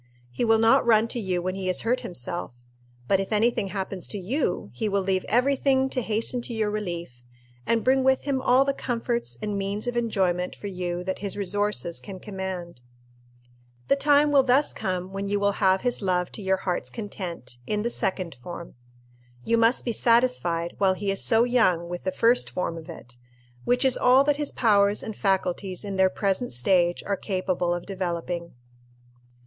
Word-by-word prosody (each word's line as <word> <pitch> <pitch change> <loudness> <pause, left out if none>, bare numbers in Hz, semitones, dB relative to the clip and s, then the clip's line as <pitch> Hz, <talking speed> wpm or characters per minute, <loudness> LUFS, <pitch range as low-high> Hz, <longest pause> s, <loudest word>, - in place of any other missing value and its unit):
He 125 - -2
will 225 -1 +4
not 225 +1 +5
run 225 -1 +4
to 240 - -2
you 185 -4 -1
when 185 0 -1
he 190 -1 -4
has 185 - +1
hurt 245 +3 +1
himself; 175 -3 -6 0.5
but 195 - +3
if 195 - -3
any 220 +3 +3
thing 200 - -2
happens 190 -1 -4
to 210 - -5
you, 195 - -2
he 210 - -2
will 200 -1 0
leave 190 -1 0
every 255 +5 +3
thing 265 -1 +1
to 255 - -1
hasten 225 +2 -1
to 235 0 -4
your 215 -1 0
relief, 170 -12 -5 0.4
and 230 -1 +2
bring 265 +1 +3
with 265 0 +3
him 275 -2 -1
all 260 +1 +4
the 275 - +1
comforts 235 - -3
and 205 -1 -2
means 200 +3 -3
of 245 0 -2
enjoyment 190 -6 0
for - - -11
you 180 -2 -3
that 190 +1 -3
his 200 0 -3
resources 205 -2 -1
can 195 -2 -9
command. 185 -7 -6 1.1
The - - +5
time 290 +1 +4
will 280 -1 +6
thus 265 +3 +2
come 185 -2 -3
when 195 0 -3
you 205 0 +1
will 200 0 +2
have 190 -1 +4
his 245 -2 -1
love 180 -2 0
to - - -8
your 190 -1 +1
heart's 180 -2 -3
content, 180 - -7
in 210 0 -1
the 235 - -1
second 185 -5 -2
form. 170 +3 -8 0.7
You 230 - +2
must 230 +2 +2
be 240 - 0
satisfied, 230 -9 +2
while 190 -1 +3
he 195 +1 -2
is 195 - +1
so 225 0 +4
young, 220 -9 +2
with 175 0 -6
the 185 - 0
first 230 +6 +3
form 180 -2 -3
of 160 -1 -10
it, 120 +1 -11 0.5
which 250 +2 +2
is 260 - +4
all 255 +2 +5
that 290 0 +1
his 295 -1 -1
powers 205 -3 +3
and 220 - -6
faculties 190 -1 -1
in 200 -1 -4
their 190 0 +4
present 195 +5 -1
stage 175 +8 +2
are 200 - 0
capable 185 -3 -1
of 175 0 -2
developing. 175 -4 -4
200 Hz, 195 wpm, -25 LUFS, 180-235 Hz, 1.1 s, will